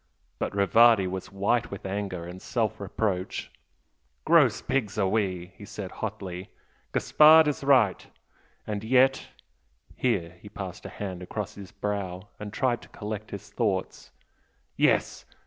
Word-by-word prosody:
But - - -2
Rivardi 110 +1 +5
was 95 +1 -5
white 100 +5 +1
with 100 - -8
anger 95 -3 -3
and 90 +2 -9
self 110 -4 -1
reproach. 100 -2 -2 0.7
"Gross 145 -10 +5
pigs 110 -6 -2
we - - +2 0.4
are!" - - -18
he - - -13
said, 105 -2 -7
hotly 95 -4 -6 0.4
"Gaspard 155 +1 +6
is 145 -1 -1
right! 130 -8 +3 0.6
And 105 -1 -4
yet 130 +3 +3 0.3
" - - -44 0.3
here 90 -8 -1
he 105 - -11
passed 95 -4 -7
a - - -8
hand 95 -3 -6
across 100 +2 -5
his 95 -3 -11
brow 100 -1 -4
and 105 -1 -6
tried 120 +1 0
to - - -15
collect 105 0 -6
his 100 - -8
thoughts - - -2 0.7
"yes! - - +2
105 Hz, 145 wpm, -27 LUFS, 95-115 Hz, 0.7 s, Gaspard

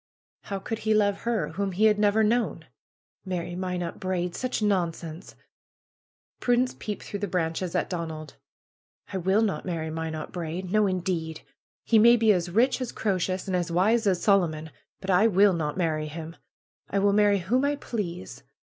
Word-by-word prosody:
How 200 - -3
could 220 +3 -4
he 220 -1 +1
love 205 -2 +2
her, 230 -4 0
whom 195 -1 -3
he 210 +5 +2
had 210 -1 +4
never 210 +1 +3
known? 230 +2 0 0.6
Marry 175 -2 -4
Minot 180 -1 -3
Braid! 180 -2 -2
Such 255 -1 -2
nonsense! 175 -4 -2 1.0
Prudence 245 +1 +1
peeped 210 -1 -5
through 205 - -5
the 205 - -2
branches 170 0 -2
at - - +1
Donald, 160 -4 -5 0.8
will 190 +4 +2
not 210 - -1
marry 165 -3 -3
Minot 160 -1 -4
Braid! 175 +1 -5
No, 215 0 +3
indeed! 175 -4 -2 0.4
He 225 - +5
may 235 +2 +7
be 220 -2 +5
as 175 -2 -1
rich 245 +8 +2
as 250 - -3
Croesus 185 -2 -1
and 190 - -1
as 175 -1 -1
wise 215 +6 +2
as 185 -3 +2
Solomon; 160 -6 +2 0.3
but 190 - -2
I 195 +5 +5
will 200 -1 +5
not 155 -2 -2
marry 155 -4 0
him! 160 +2 -7 0.5
I 200 - -1
will 200 0 +3
marry 205 -1 +4
whom 220 +9 0
I 285 +1 +1
please. 185 - -5
190 Hz, 170 wpm, -26 LUFS, 170-210 Hz, 1.0 s, may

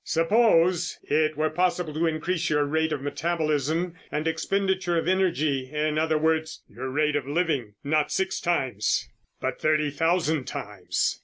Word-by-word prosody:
Suppose 175 -1 +3
it 155 0 +1
were 155 0 +1
possible 175 -1 0
to 165 +2 +1
increase 165 +2 -1
your 150 -1 +2
rate 160 +2 0
of 145 -3 -3
metabolism 160 +2 -1 0.2
and 150 +2 -1
expenditure 185 +1 0
of 165 - -1
energy, 155 -8 +1
in 150 0 0
other 160 0 +2
words, 160 0 0
your 130 +2 -6
rate 150 +2 +1
of 140 -3 -1
living, 145 - -1
not 150 +1 +1
six 190 0 -1
times, 125 - 0 0.3
but - - -3
thirty 155 -1 +2
thousand 160 -2 +1
times. 100 -3 -2
155 Hz, 150 wpm, -26 LUFS, 150-170 Hz, 0.3 s, Suppose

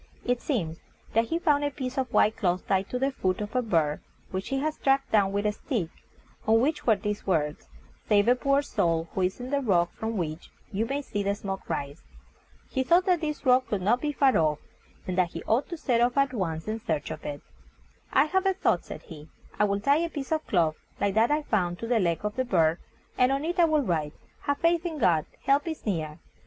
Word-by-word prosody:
It 245 0 0
seems 170 - -2 0.3
that 225 +1 +3
he 325 - -1
found 295 -4 +2
a 290 - +1
piece 265 -2 -5
of 260 -3 -2
white 215 -3 +4
cloth 180 -2 0
tied 195 0 +1
to 250 - -2
the 270 +2 +1
foot 185 -8 -1
of 210 +3 -5
a 250 - +3
bird 165 -10 +1 0.3
which 190 +1 -3
he 270 - 0
had 305 +3 0
struck 270 -2 +1
down 200 -3 +3
with 200 +1 -1
a 210 - +3
stick, 210 - -3 0.6
on 225 +1 +5
which 285 +4 0
were 220 - +6
these 210 +1 -4
words: 150 -5 -1 0.4
"Save 205 -1 +4
a 245 - +7
poor 275 +3 +1
soul, 165 - 0
who 190 - -1
is 185 +4 0
on 250 +2 -6
the 285 - +2
rock 175 -8 +2
from 220 0 -4
which 160 -2 -4 0.2
you 220 +3 -1
may 280 +3 -2
see 205 -6 -3
the 200 0 0
smoke 195 -1 -6
rise." 140 0 -4 0.7
He 260 - 0
thought 340 +8 +4
that 360 -4 +2
this 300 -1 -3
rock 255 0 +4
could 200 -3 -2
not 235 +6 +2
be 300 - 0
far 275 -2 +3
off, 155 -2 +2 0.5
and 185 - -3
that 175 -2 +1
he 165 - -6
ought 235 +6 +1
to 340 - -5
set 240 -6 +1
off 245 +2 +2
at 275 -1 +3
once 165 -7 -3
in 220 +1 -2
search 155 -8 -2
of - - -7
it. 145 -1 -6 0.7
"I - - +5
have 380 +4 +1
a 385 - +2
thought," 385 - +1
said - - -9
he; 155 -1 -12 0.3
"I 210 - +5
will 200 0 0
tie 280 +6 +4
a 335 +1 0
piece 285 -3 -6
of 315 -1 -1
cloth, 165 -5 +2 0.2
like 200 -1 +1
that 220 +3 +3
I 300 +1 +1
found, 180 -9 0
to 230 - -6
the 235 -1 +2
leg 170 -4 0
of 210 - -2
the 260 - +2
bird, 165 -7 +2 0.4
and 250 +1 +5
on 275 +2 0
it 350 +2 -2
I 345 - +7
will 310 -3 +2
write, 155 - -1 0.3
'Have 285 0 +1
faith 335 +1 +2
in 335 -3 -3
God: 170 - +2 0.2
help 280 +3 +2
is 320 -1 -5
near.' 160 -7 -2
225 Hz, 240 wpm, -27 LUFS, 180-275 Hz, 0.7 s, a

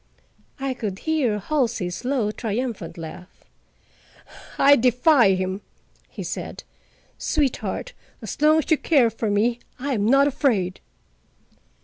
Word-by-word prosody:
I 270 -1 -2
could 210 -6 -4
hear 280 -6 0
Halsey's 225 -6 -2
low 245 -5 0
triumphant 225 -5 -4
laugh. 170 +3 -10 1.1
"I 285 +1 +7
defy 250 -3 +4
him," 185 +1 -3 0.5
he - - -7
said. - - -6 0.6
"Sweetheart, 300 - -1 0.3
as - - -7
long 305 +1 +5
as 315 - -1
you 315 - +4
care 265 -8 +3
for 225 0 -3
me, 225 +4 +1 0.2
I 275 +2 -2
am 210 -3 0
not 275 +3 +5
afraid." 245 -11 0
240 Hz, 120 wpm, -23 LUFS, 205-280 Hz, 1.1 s, I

